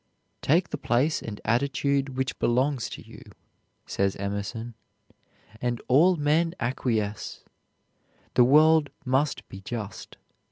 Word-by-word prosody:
"Take 170 Hz, +5 st, +2 dB
the 150 Hz, -, -3 dB
place 135 Hz, +7 st, +1 dB
and 105 Hz, -2 st, -7 dB
attitude 135 Hz, +3 st, 0 dB
which 130 Hz, 0 st, -2 dB
belong 130 Hz, +4 st, +2 dB
to 120 Hz, -, -6 dB
you," -, -, -12 dB, 0.6 s
says 100 Hz, 0 st, 0 dB
Emerson, 100 Hz, +4 st, -4 dB, 0.9 s
"and 120 Hz, -1 st, -1 dB
all 165 Hz, +8 st, +5 dB
men 160 Hz, +3 st, +1 dB
acquiesce. 110 Hz, -4 st, -2 dB, 0.9 s
The 125 Hz, -, +6 dB
world 155 Hz, +3 st, +5 dB, 0.2 s
must 135 Hz, +3 st, 0 dB
be 95 Hz, -, -10 dB
just. 105 Hz, 0 st, -7 dB
130 Hz, 115 wpm, -26 LUFS, 115-145 Hz, 0.9 s, The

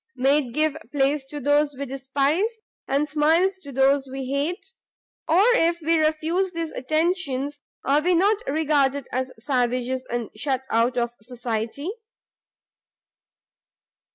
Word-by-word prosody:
made 270 Hz, 0 st, +2 dB
give 310 Hz, -1 st, +2 dB, 0.2 s
place 280 Hz, 0 st, +1 dB
to 290 Hz, +2 st, -6 dB
those 290 Hz, +1 st, +2 dB
we 280 Hz, +2 st, -4 dB
despise? 275 Hz, -, 0 dB, 0.4 s
and 280 Hz, +2 st, +1 dB
smiles 315 Hz, +6 st, +3 dB
to 280 Hz, -, -8 dB
those 270 Hz, +1 st, +3 dB
we 265 Hz, 0 st, -5 dB
hate? 285 Hz, -, -2 dB, 0.6 s
or 335 Hz, +5 st, +5 dB
if 340 Hz, -5 st, +2 dB
we 330 Hz, +1 st, +1 dB
refuse 320 Hz, +4 st, +1 dB
these 330 Hz, -1 st, -3 dB
attentions, 290 Hz, -1 st, -1 dB, 0.3 s
are 285 Hz, +2 st, +3 dB
we 355 Hz, +2 st, +2 dB
not 400 Hz, +5 st, +4 dB
regarded 285 Hz, -, +1 dB
as 255 Hz, +1 st, -2 dB
savages, 255 Hz, +1 st, -1 dB
and 235 Hz, -2 st, -3 dB
shut 265 Hz, +3 st, -1 dB
out 235 Hz, +2 st, +2 dB
of 240 Hz, -1 st, 0 dB
society?" 240 Hz, -, -3 dB
280 Hz, 125 wpm, -24 LUFS, 260-315 Hz, 0.6 s, or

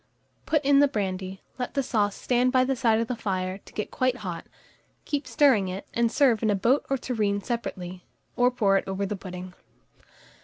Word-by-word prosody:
Put 305 Hz, -3 st, +1 dB
in 280 Hz, 0 st, +5 dB
the 285 Hz, -, +6 dB
brandy; 190 Hz, -5 st, -3 dB, 0.2 s
let 250 Hz, -, -4 dB
the 275 Hz, -, +1 dB
sauce 205 Hz, -5 st, 0 dB
stand 250 Hz, 0 st, +1 dB
by 255 Hz, -1 st, +4 dB
the 265 Hz, +1 st, 0 dB
side 230 Hz, -3 st, +2 dB
of 230 Hz, -, +1 dB
the 250 Hz, -, -2 dB
fire, 190 Hz, -3 st, -2 dB
to -, -, -17 dB
get 210 Hz, -, -4 dB
quite 255 Hz, -1 st, +1 dB
hot; 175 Hz, -2 st, -5 dB, 0.6 s
keep 290 Hz, -1 st, -2 dB
stirring 265 Hz, -10 st, +4 dB
it, 185 Hz, +2 st, -6 dB
and 235 Hz, -1 st, +2 dB
serve 250 Hz, -7 st, +3 dB
in 220 Hz, -, +1 dB
a 205 Hz, -, +3 dB
boat 240 Hz, +8 st, +2 dB
or 270 Hz, -, +1 dB
tureen 215 Hz, -5 st, -1 dB
separately, 185 Hz, -6 st, -5 dB, 0.3 s
or 245 Hz, 0 st, +4 dB
pour 205 Hz, -6 st, +2 dB
it -, -, -3 dB
over 195 Hz, +1 st, -2 dB
the 205 Hz, +1 st, -3 dB
pudding. 185 Hz, -1 st, -8 dB
220 Hz, 200 wpm, -26 LUFS, 195-255 Hz, 0.6 s, the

